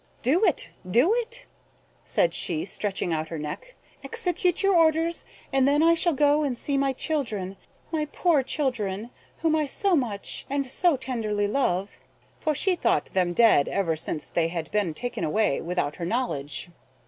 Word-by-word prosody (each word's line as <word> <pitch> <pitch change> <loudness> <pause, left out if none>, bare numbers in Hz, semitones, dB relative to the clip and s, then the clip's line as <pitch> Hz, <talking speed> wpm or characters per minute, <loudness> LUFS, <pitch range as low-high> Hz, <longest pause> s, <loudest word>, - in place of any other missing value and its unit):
"Do 310 - +3
it; - - +1 0.2
do 250 - +4
it" 485 +1 -3 0.6
(said - - +1
she, 160 -3 -1
stretching 195 -4 -2
out 155 0 -2
her 165 - -4
neck). 325 - -7 0.3
"Execute 360 -5 0
your 390 0 +4
orders, 330 0 +3 0.3
and 270 -1 +4
then 290 +2 +3
I 335 0 +6
shall 335 0 +2
go 290 +1 +3
and 270 -5 -1
see 280 - -2
my 275 0 +2
children, 225 - -2 0.4
my 310 -2 0
poor 335 -6 +3
children, 240 -6 -2 0.3
whom 320 -1 +3
I 305 -2 +1
so 385 +6 +1
much 225 -9 -3
and 280 0 0
so 300 +4 +2
tenderly 225 -6 -2
loved." 205 -5 -1 0.4
For 310 -1 0
she 380 +5 +2
thought - - 0
them 180 -2 +1
dead 225 -10 +5
ever 170 -5 0
since 155 0 -4
they 165 -1 +1
had 165 -1 -5
been 200 -7 0
taken 245 +5 -4
away 210 -2 +1
without 175 -4 -2
her 170 - -4
knowledge. 175 - -2
260 Hz, 170 wpm, -26 LUFS, 190-320 Hz, 0.6 s, I